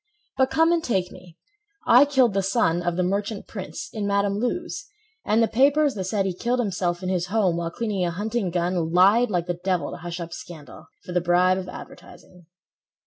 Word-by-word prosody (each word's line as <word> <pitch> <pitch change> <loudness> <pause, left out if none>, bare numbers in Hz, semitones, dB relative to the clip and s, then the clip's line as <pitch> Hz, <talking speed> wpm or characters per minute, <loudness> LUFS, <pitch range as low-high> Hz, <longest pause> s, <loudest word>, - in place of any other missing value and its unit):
But 265 0 +2
come 325 +3 +3
and 340 -1 +1
take 190 -6 -1
me, 180 -2 -15 0.5
I 250 +4 +7
killed 265 -6 +3
the 195 - +1
son 185 -4 +1
Of 175 -1 -1
the 180 - 0
merchant 200 +3 -2
prince, 190 -3 -7
in 210 -2 -3
Madam 200 0 +1
Lou's 350 - -3 0.4
And 220 +2 +2
the - - +3
papers 285 +4 +3
that 190 -2 -4
said 195 0 0
he 190 - -1
killed 240 +7 -1
himself 180 -5 -1
In 185 - -2
his 180 -1 -1
home 190 -4 +1
while 170 -1 -2
cleaning 210 -1 -2
a 175 - 0
hunting 205 +3 -2
gun— 175 -1 -1
Lied 200 +8 +5
like 175 -4 -1
the 175 -1 -4
devil 185 -2 -1
to - - -7
hush 175 +1 -6
up 170 -1 -6
scandal 160 -4 -11 0.2
For - - -7
the 180 0 +1
bribe 180 +2 +3
of 185 -1 -7
advertising. 180 -1 -13
190 Hz, 205 wpm, -24 LUFS, 175-225 Hz, 0.5 s, I